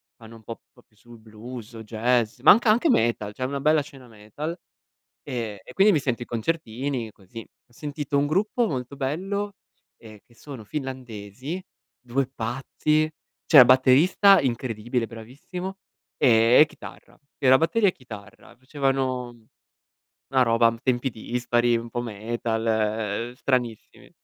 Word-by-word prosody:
fanno 115 -1 -14
un 110 - -16
po' 115 +2 -8 0.2
più 110 - -35
sul 120 +2 -16
blues 110 +2 -10
o 115 - -9
jazz, 115 +1 0
ma 145 - +8
anc 225 +4 +4
anche 230 +9 +4
metal, 110 - 0
c'è 130 +4 -4
una 140 +1 -3
bella 155 +1 +3
scena 135 -3 -13
metal; 115 +9 -7 0.7
ehm, 115 -7 -5
e 125 - -13
quindi 200 +1 +5
mi 155 - +3
sento 125 -3 -2
i - - -15
concertini 120 -2 -3
così. 100 +3 -17 0.3
Ho - - -31
sentito 145 +1 -4
un 140 - +2
gruppo 210 +9 +1
molto 130 -1 -5
bello, 195 +9 -3 0.4
ehm, 110 -2 -14
che 120 - -25
sono 130 -2 -10
finlandesi, 130 - -6 0.4
2 130 +2 -1
pazzi: 140 +6 -1 0.4
c'era 145 - +9
il 125 - +6
batterista 140 +10 +5
incredibile, 120 -1 -2
bravissimo, 140 - -8 0.4
ehm, 115 +2 +5
e - - +8
chitarra. - - -13 0.2
Era 130 -1 +5
batteria 200 +5 +2
e - - -2
chitarra. 110 - -13
Facevano 130 -1 -1 1.0
una 130 -1 +2
roba 115 -1 +3
tempi 130 0 0
dispari, 120 +1 0
un 115 0 -6
po' 120 - -3
metal, 115 0 -3 0.6
uhm, - - -11
stranissimi. 125 -4 -3
125 Hz, 145 wpm, -24 LUFS, 115-145 Hz, 1.0 s, c'era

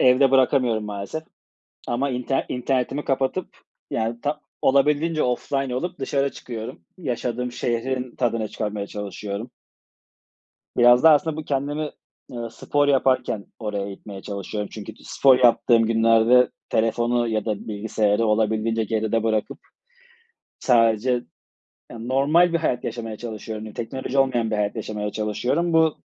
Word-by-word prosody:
evde 130 +1 +5
bırakamıyorum 125 -4 +3
maalesef. 105 +9 -5 0.7
Ama 130 +4 0
inter 125 +1 -1
internetimi 130 +2 -1
kapatıp, 135 +7 -1 0.3
yani, 115 +1 -2
ta 150 +1 -2 0.2
olabildiğince 150 +4 +3
offline 130 +1 -1
olup 175 +7 -4
dışarı 140 +1 0
çıkıyorum. 115 -6 -7 0.2
Yaşadığım 125 -5 -3
şehrin 125 +1 -2
tadını 115 -3 0
çıkarmaya 105 -2 -4
çalışıyorum. 105 +2 -6 1.3
Biraz 120 +2 +6
da 160 - +9
aslında 155 +1 +3
bu 155 - -4
kendimi, 145 +2 -2 0.4
eee, 120 -2 -5
spor 145 0 0
yaparken 130 -6 +2
oraya 105 -2 -3
itmeye 100 0 -9
çalışıyorum. 100 +1 -5
Çünkü 110 0 -8
t - - -19
spor 130 -2 +4
yaptığım 120 -1 +5
günlerde 115 +2 +4 0.2
telefonu 120 +2 +1
ya 110 -1 -1
da 105 -2 -3
bilgisayarı 105 0 0
olabildiğince 110 +1 +1
geride 110 +1 0
bırakıp, 110 -2 -1 1.0
sadece, 115 -1 +3 0.8
yani, 115 0 -7
normal 150 +7 +4
bir 170 - +2
hayat 125 -6 -1
yaşamaya 115 -2 -4
çalışıyorum. 110 -1 -6
Teknoloji 130 +4 -4
olmayan 120 -4 +2
bir 110 - 0
hayat 105 +1 -1
yaşamaya 105 -1 -4
çalışıyorum. 115 +11 -1
Bu, 160 -1 +3
120 Hz, 130 wpm, -23 LUFS, 110-135 Hz, 1.3 s, da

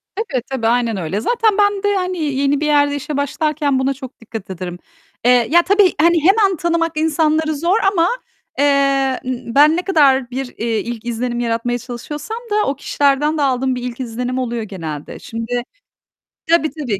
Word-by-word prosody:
Tabii, 375 - -2
tabii 245 -4 -1
aynen 235 -2 +1
öyle. 185 +3 -3
Zaten 445 - +1
ben 410 -1 +2
de 410 0 +2
hani, 365 -1 -2
yeni 280 -2 0
bir - - 0
yerde 290 -1 +3
işe 285 +1 -4
başlarken 290 -1 0
buna 265 +1 +1
çok 265 -1 -11
dikkat 225 -3 -8
ederim. 180 -1 -6 0.5
Eee, 245 -1 +4
ya 345 +2 +6
tabii, 395 +1 +3
hani 340 +1 +4
hemen 390 +1 +4
tanımak 335 0 0
insanları 315 0 +1
zor 340 +7 +1
ama, 340 -3 +2 0.5
eee, 275 -2 +2
ben 255 +5 +3
ne - - 0
kadar 275 -9 +3
bir, 265 +2 -3
eee, 230 -1 -1
ilk 235 -1 -6
izlenim 240 +1 -2
yaratmaya 240 +1 -1
çalışıyorsam 285 - -6
da 420 0 +2
o 275 - 0
kişilerden 285 +2 +1
de - - 0
aldığım 260 -1 +1
bir 250 - -5
ilk 245 0 -5
izlenim 250 +1 -3
oluyor 240 -2 -2
genelde. 160 -8 -7
Şimdi 230 +2 -4 0.9
tabii 330 -2 +3
tabii, 235 -10 -2
275 Hz, 175 wpm, -18 LUFS, 240-320 Hz, 0.9 s, ya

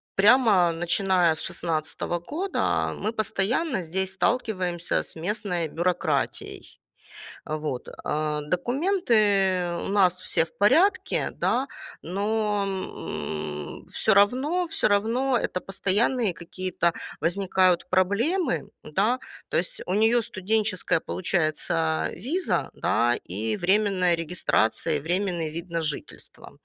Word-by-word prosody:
прямо 205 -4 +5
начиная 175 0 +2
с - - -1
16 165 +1 -2
года 365 +6 -1
мы 215 - -3
постоянно 220 - 0
здесь 190 +3 -1
сталкиваемся 185 -6 -1
с - - -8
местной 180 -3 -1
бюрократией. 175 +3 -2 0.7
Вот, 150 -4 -4 0.2
а. 150 0 -1
Документы 200 - +1
у - - -4
нас 185 -3 +3
все 175 - +2
в 165 - -19
порядке, 310 - +3
да, 260 +3 0 0.3
но, 205 +3 -1
м, 75 - -5
всё 220 - +3
равно 260 - +2
всё 325 - +2
равно 235 +6 +2
это 185 - -2
постоянные 205 +3 +1
какие-то 170 0 -2 0.3
возникают 185 +1 +2
проблемы, 235 - +1 0.2
да, 210 +11 +1 0.3
то - - 0
есть - - -2
у 180 - -2
неё 225 +4 +4
студенческая 205 -3 0
получается 160 -2 0
виза, 305 - -1
да, 120 +1 +1 0.2
и 110 +3 -2
временная 190 -2 +2
регистрация, 165 -3 0
и - - -4
временный 175 0 -1
вид 170 +2 -6
на 170 0 -2
жительство. 150 -3 -6
190 Hz, 110 wpm, -25 LUFS, 170-220 Hz, 0.7 s, прямо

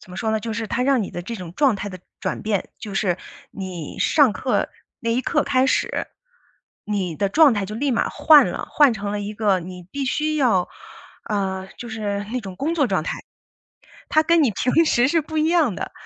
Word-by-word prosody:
怎 185 - -16
么 180 - -9
说 220 +2 -1
呢， 220 - 0
就 225 +1 -4
是 225 0 -3
他 250 - -1
让 265 -2 +2
你 195 - -5
的 175 - -5
这 230 +5 -6
种 180 -3 -8
状 275 -7 +3
态 205 - -5
的 185 -2 -8 0.2
转 - - -3
变， 215 -3 -2
就 205 - -7
是 185 -3 0 0.3
你 185 -6 -7
上 290 -7 +4
课 255 +4 -1 0.3
那 230 - -2
一 240 - +1
刻 - - +1
开 260 -2 +2
始， - - 0 0.8
你 195 -5 -2
的 200 +5 0
状 300 +5 +6
态 205 - -1
就 215 - -6
立 280 +4 0
马 - - +1
换 305 -2 +6
了， - - -5
换 290 -5 +5
成 205 -1 -4
了 210 - -2
一 205 +1 -4
个 205 -4 +1
你 180 +1 -9
必 280 -1 -2
须 305 +3 0
要， 230 -12 +2 0.6
呃， 190 -2 -2
就 240 - -7
是 205 -2 -3
那 255 - -1
种 190 -4 -9
工 320 +4 -1
作 285 -5 +2
状 190 -7 0
态。 - - -4 0.9
它 310 - +4
跟 335 0 +4
你 260 - +3
平 280 - +2
时 240 -2 +3
是 330 +4 +2
不 315 +1 -7
一 310 - +2
样 320 - +3
的。 - - -5
220 Hz, 240 characters per minute, -22 LUFS, 195-275 Hz, 0.9 s, 状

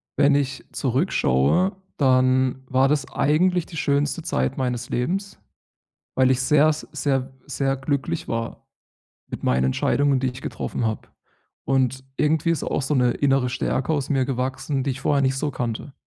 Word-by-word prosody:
wenn 140 0 +4
ich 135 -2 -1
zurückschaue, 135 - +1 0.2
dann 130 -1 +2
war 130 +1 +3
das 145 -1 +1
eigentlich 175 +3 +2
die 170 - -11
schönste 145 +1 0
Zeit 65 - -1
meines 125 -2 -2
Lebens, 195 +11 -2 0.8
weil 130 0 +4
ich 130 - +1
sehr, 150 +3 +4
s 155 0 -3
sehr, 135 -3 -1
sehr 135 -1 -1
glücklich 140 +4 -2
war 115 0 -4 0.6
mit - - -7
meinen 65 +1 +2
Entscheidungen, 140 - +2
die 130 0 0
ich 130 - -11
getroffen 120 - -4
habe. 110 -1 -3 0.6
Und 130 -1 +1
irgendwie 155 +2 +1
ist 165 - 0
auch - - -1
so 140 +3 -1
'ne 125 -2 +3
innere 135 -3 +1
Stärke 130 +3 -1
aus 145 -2 -2
mir 135 -2 +2
gewachsen, 130 +2 -2
die 135 - -1
ich 130 - -5
vorher 140 0 +2
nicht 135 0 +1
so 145 +1 -2
kannte. 120 +2 -4
135 Hz, 165 wpm, -23 LUFS, 130-145 Hz, 0.8 s, wenn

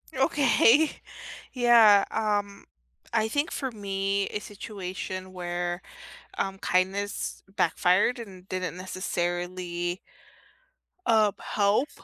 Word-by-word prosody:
Okay. 275 +1 +4 0.6
Yeah, 230 -5 +6
um, 205 -2 -1 0.5
I 220 -1 +2
think 285 +7 -1
for 265 -2 -3
me 195 -2 -1
a 210 - -4
situation 185 -2 -7
where, 175 0 -3 0.6
um, 195 0 -2
kindness 195 +2 -1
backfired 185 +8 +2
and 190 -5 -10
didn't 185 -1 -3
necessarily 175 -1 -3 1.1
uh, 220 -2 +4
help 210 +8 +1
195 Hz, 90 wpm, -27 LUFS, 185-220 Hz, 1.1 s, Yeah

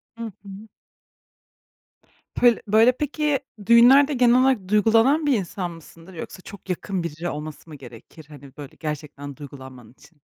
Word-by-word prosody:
Hı 230 -1 -7
hı. 200 +2 -11 1.7
Pöl 240 -2 +4
böyle, 220 +4 +5
peki, 295 +1 -2 0.3
düğünlerde 260 +6 +6
genel 250 -1 +4
olarak 255 -8 +1
duygulanan 225 +9 +3
bir 285 - +2
insan 180 -1 -5
mısındır 165 +2 -15
yoksa 180 +2 -9
çok 195 0 -13
yakın 185 0 -3
biri 170 +1 -5
olması 155 +1 -8
mı 155 - -10
gerekir? 135 +3 -14
Hani, 140 -2 -14
böyle, 145 -2 -10
gerçekten 145 -2 -7
duygulanman 130 -4 -12
için. 145 +4 -23
190 Hz, 140 wpm, -23 LUFS, 150-235 Hz, 1.7 s, düğünlerde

